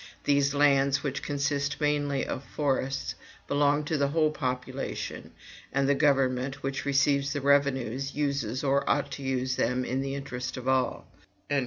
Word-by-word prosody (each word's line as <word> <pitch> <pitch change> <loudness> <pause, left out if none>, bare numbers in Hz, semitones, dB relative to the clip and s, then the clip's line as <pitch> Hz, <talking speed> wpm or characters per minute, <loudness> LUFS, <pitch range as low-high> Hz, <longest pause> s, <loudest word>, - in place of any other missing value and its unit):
These 140 0 +2
lands, 140 -1 +3
which 140 -2 -2
consist 140 0 -1
mainly 145 -2 +1
of 130 - -4
forests, 135 -2 -1 0.3
belong 145 +1 +2
to 150 0 -1
the 140 - +3
whole 155 +1 +2
population, 125 -4 -4 0.4
and 135 0 +1
the 140 - +4
government, 135 -1 +1
which 135 +1 -3
receives 140 0 +2
the 145 - -2
revenues, 135 -2 +1
uses 140 -4 -1
or 140 0 +2
ought 140 0 +1
to - - -6
use 130 -1 -1
them 125 +1 +1
in 130 +2 -1
the 135 0 -3
interest 130 -2 -5
of 130 0 -6
all." 130 -1 +1
140 Hz, 155 wpm, -28 LUFS, 130-145 Hz, 0.4 s, the